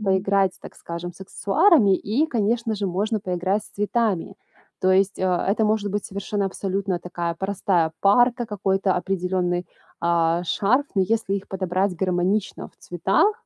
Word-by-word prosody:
поиграть, 195 -1 +2
так - - -12
скажем, 170 +1 -6
с 175 - -20
аксессуарами 200 - +3
и, 240 +13 0
конечно 230 -3 0
же, 200 -1 -2
можно 210 +5 -1
поиграть 190 +2 -1
с - - -16
цветами. 205 -3 -1 0.5
То 185 - +3
есть, 195 +1 +2
э, - - -3
это 190 +4 +1
может 210 -1 0
быть 205 +1 -2
совершенно, 200 +1 -3
абсолютно, 195 -1 -2
такая 170 -1 -4
простая 185 -3 0
парка, 240 +4 +3
какой-то 195 -2 0
определенный, 180 -1 -1 0.3
а, 170 0 +1
шарф. 225 +10 +2
Но 195 - +2
если 215 0 0
их 195 - -8
подобрать 185 0 -1
гармонично 185 +3 -1
в - - -32
цветах, 190 - +1
195 Hz, 150 wpm, -23 LUFS, 180-210 Hz, 0.5 s, аксессуарами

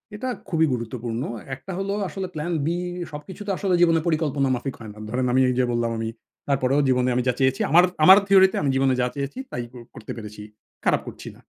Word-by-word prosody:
এটা 255 +5 -4 0.2
খুবই 160 -2 +3
গুরুত্বপূর্ণ। 120 0 -4 0.3
একটা 190 - -10
হলো 195 +1 -2
আসলে 190 0 -5
plan 155 +3 -3
B - - -1 0.4
সবকিছু 150 +7 -9
তো - - 0
আসলে 190 -3 0
জীবনে 165 -2 +5
পরিকল্পনা 150 -4 +1
মাফিক 125 +2 -5
হয় 110 -2 -9
না। 105 - -18
ধরেন 125 +2 -1
আমি 130 - +4
এইযে 125 0 +1
বললাম 120 -1 0
আমি 115 0 -2 0.4
তারপরেও 135 0 +2
জীবনে 125 0 +2
আমি 125 - +1
যা 125 - +3
চেয়েছি, 130 0 +2
আমার 175 +2 +7 0.2
আমার 190 +4 +10
থিওরিতে 190 -1 +6
আমি 145 - 0
জীবনে 135 0 +3
যা 125 - +2
চেয়েছি 140 - -4
তাই 120 - -3
ক - - -18 0.2
করতে 110 - -8
পেরেছি। 105 -1 -8 0.4
খারাপ - - +3
করছি - - -9
না। - - -19
135 Hz, 210 wpm, -24 LUFS, 125-170 Hz, 0.4 s, আমার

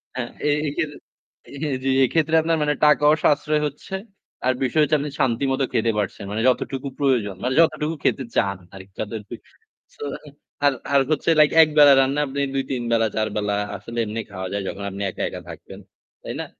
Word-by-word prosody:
হ্যাঁ, 120 -2 -3 0.2
এই 145 - +2
এই 140 - -1
ক্ষেত্রে 155 -3 -2 0.7
হ্যাঁ, 145 -3 -1
জি, 135 - 0
এইক্ষেত্রে 160 +4 +1
আপনার 165 0 +1
মানে 150 0 +1
টাকাও 150 0 +5
সাশ্রয় 150 +1 +2
হচ্ছে, 150 +7 -8 0.5
আর 130 - +3
বিষয় 145 +5 +2
হচ্ছে 150 +1 +2
আপনি 145 0 -4
শান্তিমত 135 +2 0
খেতে 115 0 +2
পারছেন। 105 0 -3
মানে 110 +2 -2
যতটুকু 135 +2 -2
প্রয়োজন, 125 -9 +1
মানে 125 - 0
যতটুকু 155 0 +1
খেতে 135 - +1
চান 100 -1 +1 0.2
আর 95 - -9 0.2
যাদের 110 0 -4 0.7
So - - -9 0.6
আর 140 - +5 0.2
আর 140 - +6
হচ্ছে 155 - 0
like 150 - +5
একবেলার 150 -3 +6
রান্না 135 +2 0
আপনি 140 +1 -5 0.2
২-৩ 130 -2 -2
বেলা, 115 -1 +3
৪ 110 0 +1
বেলা 105 -1 0 0.2
আসলে 115 +5 -9
এমনি 110 +2 -4
খাওয়া 95 -1 -5
যায় 100 -1 -2
যখন 100 - -7
আপনি 100 - -7
একা, - - -7
একা - - -8
থাকবেন। - - -10 0.4
তাই - - -5
না? - - -5
135 Hz, 185 wpm, -22 LUFS, 115-150 Hz, 0.7 s, আর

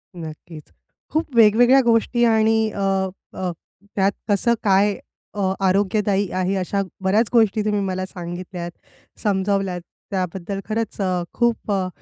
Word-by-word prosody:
नक्कीच. 160 -1 -10 0.4
खूप 310 -4 -1
वेगवेगळ्या 235 +4 +6
गोष्टी 235 +1 +2
आणि 220 -1 +3
अ, - - -7 0.5
अ, 185 -1 -3 0.4
त्यात 195 0 +3 0.2
कसं 205 +4 +3
काय 200 0 +3 0.4
अ, 190 -2 +1 0.2
आरोग्यदायी 200 0 +1
आहे. 185 +1 0
अशा 195 +1 -1 0.2
बऱ्याच 210 +4 +2
गोष्टी 220 -2 +3
तुम्ही 210 -1 +1
मला 185 0 -2
सांगितल्यात, 175 -1 -6 0.5
समजावल्यात 195 -2 0 0.3
त्याबद्दल 190 +1 -3
खरंच 220 -1 -2
अ, 185 -2 0
खूप 235 -3 0
अ, 190 -2 0
200 Hz, 125 wpm, -22 LUFS, 185-220 Hz, 0.5 s, वेगवेगळ्या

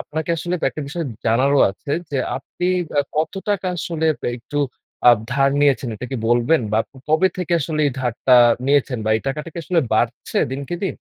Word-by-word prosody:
আপনাকে 160 +2 -4
আসলে 175 +2 -3 0.2
একটা 155 - -6
বিষয় 165 +3 -3 0.2
জানারও 130 +5 +3
আছে 140 +8 -6 0.2
যে 140 - -2 0.2
আপনি 140 +6 -5 0.3
অ্যা 145 - +2
কত 155 +1 0 0.2
টাকা 200 -2 0
আসলে 165 -1 -3 0.3
একটু 130 +4 -5 0.5
আপ 120 - +5
ধার 135 0 +3
নিয়েছেন 140 -3 +2
এটা 125 +4 -6
কি 135 - -2
বলবেন? 120 +6 +3
বা 110 - +3
ক - - -84 0.2
কবে 160 +5 +4
থেকে 180 -2 -3
আসলে 155 +2 -2
এই 140 - 0
ধারটা 125 +1 +2 0.3
নিয়েছেন 140 -3 +2
বা 110 - 0
এই - - -4
টাকাটা 150 +4 -3
কি - - -7
আসলে 175 0 +2
বাড়ছে 115 +3 0
দিনকে 140 +5 -4
দিন? 195 - -1
140 Hz, 190 wpm, -21 LUFS, 125-160 Hz, 0.5 s, আপ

